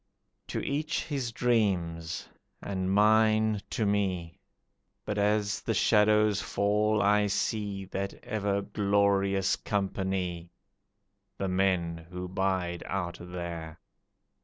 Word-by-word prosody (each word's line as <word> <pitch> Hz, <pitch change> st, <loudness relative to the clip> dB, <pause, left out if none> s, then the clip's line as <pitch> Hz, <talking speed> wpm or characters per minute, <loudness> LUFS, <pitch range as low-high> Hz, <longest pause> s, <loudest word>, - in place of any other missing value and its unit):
To -, -, -3 dB
each 150 Hz, +3 st, -1 dB
his 135 Hz, -6 st, -3 dB
dreams, 90 Hz, -9 st, 0 dB, 0.3 s
and 95 Hz, -1 st, -2 dB
mine 110 Hz, +1 st, +4 dB
to 110 Hz, -, -1 dB
me, 95 Hz, -4 st, -1 dB, 0.7 s
But 105 Hz, 0 st, -2 dB
as 105 Hz, 0 st, +1 dB
the -, -, -1 dB
shadows 105 Hz, -1 st, +4 dB
fall 105 Hz, +1 st, +1 dB
I 105 Hz, +1 st, +4 dB
see 100 Hz, -1 st, -1 dB
That 100 Hz, +1 st, -4 dB
ever 100 Hz, -2 st, -1 dB
glorious 100 Hz, -1 st, +2 dB
company 95 Hz, -4 st, -2 dB, 0.9 s
The 95 Hz, -, -2 dB
men 90 Hz, -3 st, +1 dB
who 90 Hz, 0 st, -5 dB
bide 95 Hz, -2 st, -1 dB
out 90 Hz, -2 st, -3 dB
there. 85 Hz, -2 st, -6 dB
100 Hz, 105 wpm, -29 LUFS, 90-105 Hz, 0.9 s, mine